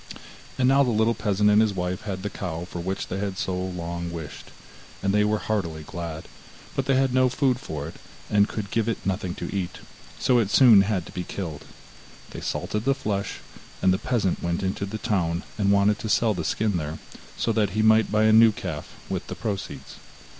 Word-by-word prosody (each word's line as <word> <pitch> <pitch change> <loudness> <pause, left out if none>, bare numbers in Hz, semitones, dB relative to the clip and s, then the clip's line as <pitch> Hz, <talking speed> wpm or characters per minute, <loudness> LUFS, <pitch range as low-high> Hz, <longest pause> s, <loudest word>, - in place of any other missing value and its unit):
And 125 - +3
now 135 +1 +5
the 130 - +3
little 110 0 +3
peasant 105 -2 +2
and 105 +1 +6
his 105 -3 +1
wife 90 0 -2
had 95 -2 -4
the 105 - -2
cow 85 -3 -4
for 90 - -7
which 95 +3 -3
they 95 - -4
had 100 -2 -3
so 95 - -1
long 85 -2 -4
wished, 75 -4 -8 0.5
and 100 0 +1
they 105 0 +4
were 105 +1 +2
heartily 85 -8 -2
glad, 80 -1 -6 0.5
but - - -1
they 135 - +3
had 130 -1 +2
no 130 0 +4
food 130 -1 +1
for 75 - -5
it, 80 - -10 0.3
and 105 0 +3
could 100 -3 -5
give 115 0 +1
it 115 - -3
nothing 95 -1 -2
to - - -5
eat, 95 -3 -3 0.4
so 125 -2 +3
it 105 -4 +1
soon 115 -4 +7
had 100 -4 0
to - - -11
be 90 - -4
killed. 85 -6 -6 0.7
They - - -7
salted 105 0 -2
the 135 +2 +2
flesh, 100 -7 -3 0.4
and 95 -1 +4
the 95 - 0
peasant 110 -7 0
went 85 +2 -1
into 95 +1 -2
the 110 +2 -4
town 90 -5 0
and 100 -2 +2
wanted 100 +1 +3
to 110 - -4
sell 110 0 +3
the 90 -4 -3
skin 105 -4 0
there, 80 0 -4 0.4
so 115 - +1
that 110 -2 +2
he 110 - +3
might 110 -1 +5
buy 105 0 +3
a 110 0 +5
new 110 0 +8
calf 90 -7 -6
with - - -4
the - - -5
proceeds. 105 -4 -5
100 Hz, 215 wpm, -25 LUFS, 90-110 Hz, 0.7 s, new